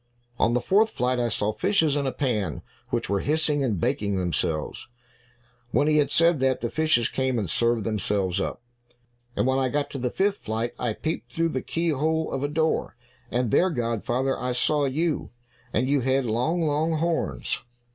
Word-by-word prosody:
"On 120 - +3
the - - +3
fourth 210 - +3
flight, 125 - 0
I 120 -1 +1
saw 105 -1 0
fishes 160 - +2
in 140 -2 0
a - - 0
pan, 105 - -2 0.3
which - - -1
were 100 0 +1
hissing 150 0 +1
and 110 -9 0
baking 100 +4 0
themselves." 85 -3 -2 0.8
When 145 - +2
he 155 0 +4
had 150 - +3
said 165 -2 +4
that, 130 -1 +1
the 120 - -2
fishes 155 -7 +2
came 130 -2 -1
and 105 -4 -1
served 115 +5 +2
themselves 100 -3 0
up. 120 - -4 0.7
"And - - +1
when 130 +1 +2
I 130 - +2
got 145 +2 -1
to 135 - -5
the 125 0 -1
fifth 200 +7 +1
flight, 115 +2 -3
I 120 -3 0
peeped 160 +8 -4
through 165 0 +1
the 130 -5 -2
keyhole 160 0 0
of 135 - -2
a 145 - 0
door, 160 -1 0 0.3
and 120 -2 0
there, 185 - +4
godfather, 120 - -1
I 125 0 -1
saw 145 +3 +2
you, 155 +4 -1 0.4
and 125 +4 +1
you 140 +1 +3
had 130 +1 +1
long, 125 +10 0
long 155 +2 +1
horns." 160 - -1
130 Hz, 185 wpm, -25 LUFS, 115-155 Hz, 0.8 s, he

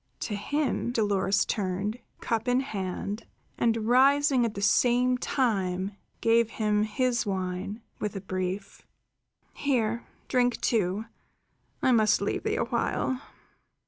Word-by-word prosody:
To 210 - -2
him 280 +3 -1
Dolores 200 -4 +2
turned, 200 +3 -2 0.2
cup 225 0 -1
in 250 +1 +3
hand, 205 -2 -4 0.3
and 225 -2 +1
rising 270 +1 +5
at 225 - -3
the 200 - -4
same 250 +3 +4
time 195 -8 0 0.3
gave 230 0 +4
him 210 -2 +1
his 240 +3 +1
wine 190 +2 -3 0.2
with 210 -1 -3
a 195 - -4
brief: 185 +1 -4 0.7
"Here, 235 -5 0 0.2
drink, 245 -2 +2
too. 210 -1 0 0.8
I 260 - +4
must 215 -3 +4
leave - - -1
thee - - -1
a - - +1
while." 260 0 -1
220 Hz, 125 wpm, -28 LUFS, 200-245 Hz, 0.8 s, rising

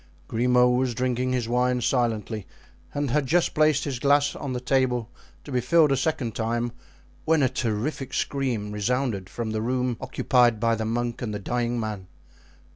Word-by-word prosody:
Grimaud 125 +1 +3
was 130 -2 0
drinking 125 +1 0
his 125 -3 -1
wine 125 +1 +1
silently 115 -4 -1 0.4
and 145 -3 -2
had 145 -1 +1
just 175 +5 +2
placed 155 -1 +3
his 135 -4 -3
glass 145 +2 +3
on 140 -3 -5
the 125 - -2
table 125 -2 0 0.3
to 145 - -10
be 125 -1 +1
filled 150 +4 +4
a - - +4
second 130 -4 -1
time, 115 +2 -1 0.5
when 160 -2 +3
a 130 - +3
terrific 120 +5 -2
scream 125 -7 -1
resounded 105 -2 -1
from 110 +5 -4
the 110 0 -2
room 125 0 -1
occupied 120 -4 +2
by 115 +1 +2
the 110 0 -2
monk 120 +1 -2
and 110 -4 -3
the - - -3
dying 120 +3 -1
man. 105 -4 -4
125 Hz, 175 wpm, -25 LUFS, 115-130 Hz, 0.5 s, filled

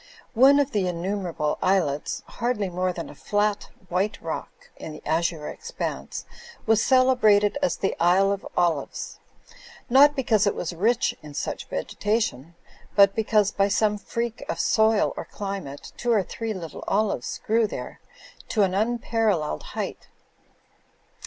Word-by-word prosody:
One 270 +4 +6
of 285 -1 +1
the 200 -5 0
in 175 -2 -3
numerable 180 -6 -2
islets, 170 -7 0
hardly 235 -5 -2
more 185 +1 0
than 170 -2 -6
a - - -10
flat 205 0 -1 0.2
white 190 +5 -1
rock 165 - -7
in 155 - -8
the - - -12
azure 165 -1 0
expanse, 470 +2 -5 0.4
was 225 0 +3
celebrated 250 -4 +4
as 280 - +1
the 195 - -1
Isle 185 +3 +4
of 200 -1 -3
Olives; 165 -5 -1 0.7
not 285 +3 +7
because 225 -7 +2
it - - +1
was 175 0 -3
rich 220 +8 +1
in 150 -1 -11
such - - -4
vegetation, 170 - -2 0.4
but 200 -1 +6
because, 210 -2 +2
by 195 0 +2
some 210 +1 +1
freak 235 +4 -4
of - - -2
soil 220 -1 +3
or - - -5
climate, 195 -9 -6
two 240 - 0
or 215 -4 +3
three 225 +4 -4
little 165 -5 -7
olives 210 +1 0
grew 225 0 +3
there - - -7 0.5
to 215 - +2
an 185 -1 +1
unparalleled 215 - 0
height. - - -6
205 Hz, 145 wpm, -25 LUFS, 175-225 Hz, 0.7 s, not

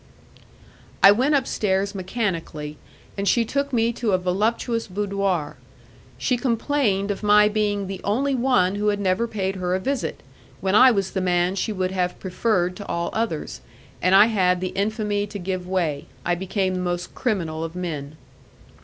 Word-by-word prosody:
I 195 - +10
went 260 +8 +3
upstairs 200 -7 0
mechanically, 180 -7 -3 0.4
and 200 0 -2
she 230 +4 +3
took 280 +4 -1
me 235 -1 +1
to 225 -3 -1
a - - +5
voluptuous 220 +6 -1
boudoir; 195 -5 -2 0.6
she 250 - 0
complained 230 -5 0
of 200 - -4
my 210 0 +5
being 205 -1 0
the 190 0 -6
only 265 +7 +1
one 245 -8 +2
who 205 +1 -1
had 205 -1 +1
never 195 +4 +1
paid 195 -3 -2
her 180 0 -1
a - - 0
visit, 270 +7 -3 0.4
when 190 0 -1
I 255 +5 +8
was 195 -5 0
the 190 - -2
man 180 0 +1
she 200 +3 -2
would 185 -2 -1
have 180 -1 -1
preferred 180 -1 0
to 205 - -8
all 170 0 -2
others, 215 - -3 0.4
and 185 +1 +4
I 200 +2 +9
had 185 -5 +2
the 185 0 -2
infamy 205 0 -1
to 205 0 -7
give 185 -1 -4
way.... 170 -6 -1 0.2
I 175 - +2
became 190 +1 -1
the 185 - -2
most 175 -1 -3
criminal 170 -10 -2
of 165 +1 -6
men. 155 -5 -5
195 Hz, 170 wpm, -23 LUFS, 180-215 Hz, 0.6 s, I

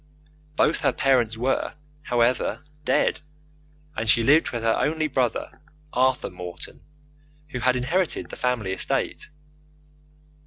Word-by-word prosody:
Both 155 - +3
her - - +2
parents 120 -5 +2
were, 130 +5 -1 0.3
however, 125 +3 +1 0.2
dead, - - +2 0.8
and 115 -6 -2
she 115 - +4
lived 150 +6 +5
with 120 -2 -4
her 115 0 +3
only 155 +1 0
brother, 130 -5 -2 0.3
Arthur 130 +1 +1
Morton, 90 -1 -9 0.7
who 125 - -4
had 125 +1 +2
inherited 165 +9 -1
the - - -6
family 120 -6 -1
estate. 95 - -2
125 Hz, 120 wpm, -24 LUFS, 115-135 Hz, 0.8 s, lived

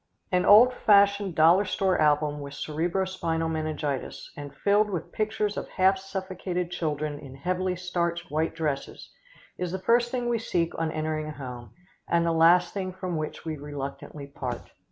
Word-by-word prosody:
An 180 -1 +2
old 240 +5 +8
fashioned 200 -4 +4
dollar 170 +5 +6
store 190 -2 0
album 150 -1 +2
with 140 -1 -8
cerebro 170 +7 -1
spinal 165 -3 -2
meningitis, 155 -3 -3
and 145 -1 -7
filled 205 +8 +2
with 175 -5 -4
pictures 215 -1 -1
of - - -5
half 190 0 +3
suffocated 185 -2 -4
children 150 -3 -2
in 135 -3 -11
heavily 180 +5 -1
starched 175 -3 -2
white 160 +2 -1
dresses, 150 -4 -4 0.5
is 180 -1 -2
the 190 - -2
first 235 +5 +2
thing 245 -1 -2
we 235 -1 +1
seek 170 -6 -1
on 165 -1 0
entering 155 -1 -2
a - - -5
home, 125 -6 -9 0.3
and 170 0 +2
the 170 - +2
last 165 +2 +5
thing 190 -2 -3
from 185 -1 -4
which 155 +1 -5
we 160 -1 -3
reluctantly 145 0 -7
part. 130 -4 -6
170 Hz, 170 wpm, -27 LUFS, 150-190 Hz, 0.5 s, old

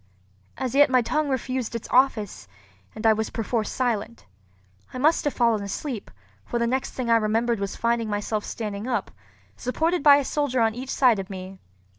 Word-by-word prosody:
As 260 -3 -3
yet 290 +1 +6
my 255 -2 +3
tongue 305 +4 0
refused 255 -2 -2
its 230 - -5
office, 225 - +2 0.5
and 215 - -6
I 220 - +7
was 220 0 -2
perforce 225 -1 -2
silent. 235 -3 -2 0.7
I - - -7
must 305 +5 +2
have 290 - 0
fallen 235 -3 +2
asleep; 215 +4 -5 0.3
for 240 - -3
the 235 - +1
next 260 +3 -1
thing 245 -3 -2
I 230 - +6
remembered 225 +1 +1
was 200 -1 -3
finding 235 -1 0
myself 205 +1 -2
standing 210 0 -5
up, 245 -2 -2 0.4
supported 320 +7 -1
by 285 0 +8
a 285 -1 +1
soldier 285 -4 0
on 225 -1 +2
each 255 +3 -7
side 245 -7 +3
of 195 +1 -6
me. 190 0 -8
235 Hz, 185 wpm, -25 LUFS, 215-260 Hz, 0.7 s, by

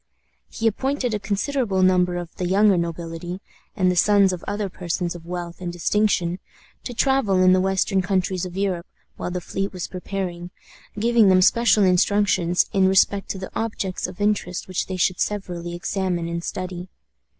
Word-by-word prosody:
He 225 - -5
appointed 255 +2 0
a 210 - -1
considerable 205 0 0
number 180 -1 +3
of 175 -1 -6
the 180 - -2
younger 200 +2 +4
nobility, 170 +1 -4 0.4
and 185 -3 +2
the - - -1
sons 200 +1 +4
of 180 - -6
other 205 0 -2
persons 175 -1 -3
of 170 -1 -11
wealth 175 0 -6
and 175 -1 -3
distinction, 180 0 0 0.5
to 245 - -5
travel 265 -6 +2
in 185 0 +6
the 185 - +3
western 190 +1 +1
countries 185 -1 -1
of 180 0 -6
Europe 190 -3 -1 0.3
while - - -4
the 180 0 -3
fleet 195 +3 -3
was 180 -2 -5
preparing, 180 -2 -5 0.5
giving 230 -1 +4
them 185 -1 +5
special 220 -1 +4
instructions 180 -1 +3
in 190 -1 +4
respect 195 +1 +2
to - - -3
the 190 - -7
objects 200 -6 -2
of 185 +1 -11
interest 205 -3 -1
which 185 -1 -2
they 185 - -4
should 180 +1 +1
severally 175 -4 -3
examine 175 -1 -2
and 170 0 -4
study. 185 0 -5
185 Hz, 175 wpm, -23 LUFS, 175-200 Hz, 0.5 s, in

